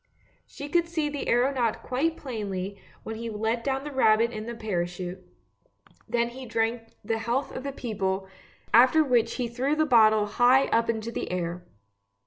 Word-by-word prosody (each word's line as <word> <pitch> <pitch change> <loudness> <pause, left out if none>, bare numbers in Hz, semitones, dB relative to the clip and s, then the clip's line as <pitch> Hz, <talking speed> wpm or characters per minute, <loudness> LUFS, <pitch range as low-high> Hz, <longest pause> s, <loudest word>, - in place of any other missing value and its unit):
She 285 - -8
could 340 +3 +1
see 320 -3 -1
the 290 -1 -5
THE - - -4
BOTTLE - - +2
NECK 245 - +4
91 - - +3 0.2
aeronaut 225 - -5
quite 310 +6 -1
plainly 200 -6 -5 0.2
when 220 0 -6
he 230 0 -5
let 225 +2 -2
the 270 +2 -2
rabbit 230 -3 +4
down 225 - -6
in 215 - -7
the 235 - -5
parachute; 180 -3 -4 0.9
then 235 0 +1
he 255 +1 -9
drank 225 +1 0 0.2
the 225 +1 -1
health 240 +5 -2
of - - -4
the 275 +1 -4
people, 195 -7 -3 0.5
after 260 +7 +6
which 245 -5 +2
he 250 -2 -1
threw 255 +5 -1
the 310 0 +2
bottle 220 -5 +5
high 245 +5 +4
up 230 0 +2
into 225 0 -2
the - - -4
air. 175 0 -3
230 Hz, 190 wpm, -27 LUFS, 215-260 Hz, 0.9 s, after